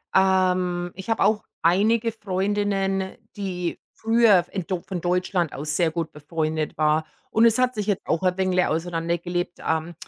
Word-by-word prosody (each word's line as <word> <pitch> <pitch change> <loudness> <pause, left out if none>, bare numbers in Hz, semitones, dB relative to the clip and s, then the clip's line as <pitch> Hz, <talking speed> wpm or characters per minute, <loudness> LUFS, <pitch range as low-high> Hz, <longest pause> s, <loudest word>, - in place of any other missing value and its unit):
Ähm, 185 -2 +2
ich 190 +1 -9
habe - - 0
auch 215 -1 +2 0.2
einige 220 +7 +3
Freundinnen, 195 -1 -1 0.2
die 180 -3 -3 0.2
früher 225 -5 +4
in 190 -4 -4
Deu 185 -1 -3
von 185 -2 -5
Deutschland 180 -1 0
aus 150 +2 -2
sehr 170 -2 +2
gut 165 0 -3
befreundet 155 +1 -3
war. 155 +1 +2 0.2
Und 225 +1 +4
es 230 +1 +5
hat 255 0 +2
sich 210 -2 -2
jetzt 205 -2 -2
auch 165 +3 0
ein 180 -1 +2
wenig 185 -1 +2
auseinandergelebt. 175 +1 -2
Ähm, 160 +1 -1
180 Hz, 160 wpm, -24 LUFS, 170-200 Hz, 0.2 s, es